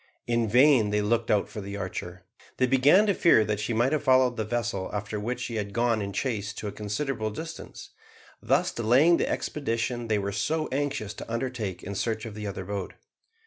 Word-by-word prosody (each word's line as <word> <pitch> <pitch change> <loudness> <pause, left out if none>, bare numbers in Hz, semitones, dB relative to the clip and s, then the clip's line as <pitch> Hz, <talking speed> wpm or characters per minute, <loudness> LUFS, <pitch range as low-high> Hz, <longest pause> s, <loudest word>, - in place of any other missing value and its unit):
In 120 -1 +1
vain 125 -1 +5
they 105 0 +1
looked 115 +2 0
out 105 -2 +2
for 105 - -7
the 100 +1 -6
Archer. - - -6 0.3
They 130 - +3
began 135 +10 +5
to 205 - +2
fear 140 - +4
that 105 0 -1
she 105 +3 -2
might 120 +4 +2
have 155 - +1
followed 130 -3 +4
the 110 - -2
vessel 105 -4 -2
after 105 +1 -4
which 120 +5 -3
she 115 - -3
had 100 -1 -4
gone 115 -1 +1
in 100 0 -3
chase 105 -1 -2
to 105 - -6
a - - -3
considerable 110 +3 -3
distance, 160 +10 -8 0.5
thus - - +2
delaying 130 +10 +4
the - - 0
expedition 120 -3 -2
they 110 -1 +1
were 100 0 -2
so 155 +11 -1
anxious 135 -7 -2
to 110 - -9
undertake 115 -6 -3
in 100 - -5
search 110 +2 -2
of 110 - -7
the 105 0 -6
other 95 -1 -5
boat. 100 -1 -5
115 Hz, 205 wpm, -27 LUFS, 105-130 Hz, 0.5 s, vain